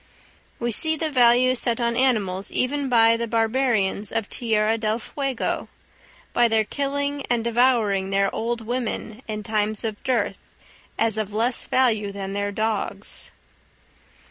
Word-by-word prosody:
We 240 0 -1
see 315 +8 +3
the 315 0 -2
value 250 0 +5
set 240 -1 0
on 235 -1 0
animals 205 -7 +1
even 280 +2 0
by 230 -2 +5
the 235 0 -3
barbarians 225 -3 +1
of 225 -2 -1
Tierra 220 -2 +1
del 220 -1 0
Fuego, 270 +2 -3 0.7
by 240 - +4
their 220 -1 +3
killing 285 +3 -2
and 240 -2 +1
devouring 230 -5 +2
their 195 0 +1
old 230 +1 -2
women, 235 -1 -4
in 215 -1 -4
times 215 0 -1
of 220 -2 -4
dearth, 255 -1 0 0.6
as 225 -1 +1
of 210 -1 -3
less 235 +3 0
value 220 -6 +2
than 195 -1 -5
their 205 0 -1
dogs. 215 0 -3
230 Hz, 145 wpm, -23 LUFS, 215-250 Hz, 0.7 s, value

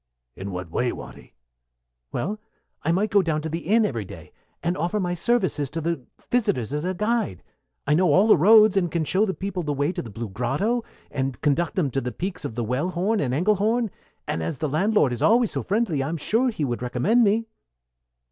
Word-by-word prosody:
"In 95 +1 -6
what 90 -3 -6
way, 120 +7 0
Watty?" - - -11 0.8
"Well, 210 +6 -3 0.4
I 165 - 0
might 200 +5 +1
go 200 - +5
down 155 -4 -1
to 160 - -3
the 165 +2 -2
inn 215 +6 +3
every 115 - -2
day, - - -11 0.3
and 175 +1 0
offer 175 +6 -1
my 175 -2 -1
services 180 - 0
to 160 +4 -4
the 165 -3 -2 0.3
visitors 140 - +1
as 150 +1 -2
a 185 +1 -2
guide. 210 - -1 0.4
I 150 - +2
know 175 +1 +3
all 190 +8 +5
the 220 - +7
roads, 215 +4 +6
and 180 -3 +2
can 160 0 -1
show 195 +7 +2
the 190 - -2
people 195 -2 -3
the 150 -3 -2
way 145 +4 +1
to - - -4
the 115 - -9
Blue 115 +1 -6
Grotto, 140 - -1 0.3
or 135 0 -1
conduct 155 +3 +1
them 155 -8 +1
to 135 - -1
the 125 0 -3
peaks 180 +4 -5
of 110 - -5
the 120 - -1
Wellhorn 175 - 0
and 130 -4 0
Engelhorn; 210 - +1 0.4
and 80 - -2
as 80 - -3
the 155 - -1
landlord 155 - +2
is 120 - -5
always 230 0 +4
so - - -2
friendly, 195 -8 0
I'm 160 +5 -2
sure 230 - +2
he 160 -11 -2
would 120 -3 -3
recommend 130 - +2
me." 220 +2 +2
170 Hz, 215 wpm, -24 LUFS, 135-210 Hz, 0.8 s, the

